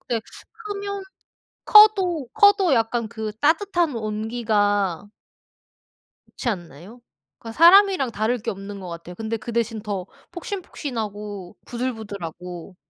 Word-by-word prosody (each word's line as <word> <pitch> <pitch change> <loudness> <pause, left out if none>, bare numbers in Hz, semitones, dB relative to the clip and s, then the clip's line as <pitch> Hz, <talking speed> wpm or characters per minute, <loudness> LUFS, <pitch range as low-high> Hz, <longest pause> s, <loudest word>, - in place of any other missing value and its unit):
근데 235 -3 -2 0.3
크면 405 -2 -6 0.6
커도, 385 - +6
커도 405 -6 +5
약간 230 0 0
그 220 -2 -5
따뜻한 340 0 +1
온기가 210 -3 -1 1.2
그렇지 240 - -4
않나요? 180 - -7 0.4
그 225 - -8
사람이랑 345 - +6
다를 220 +4 0
게 230 +2 -4
없는 200 0 -8
것 185 -2 -8
같아요. 170 +1 -8
근데 225 +3 -3
그 235 +2 -7
대신 230 -1 -1
더 200 -4 -4 0.3
폭신폭신하고 215 - -6
부들부들하고. 200 -8 -6
225 Hz, 255 characters per minute, -23 LUFS, 205-330 Hz, 1.2 s, 커도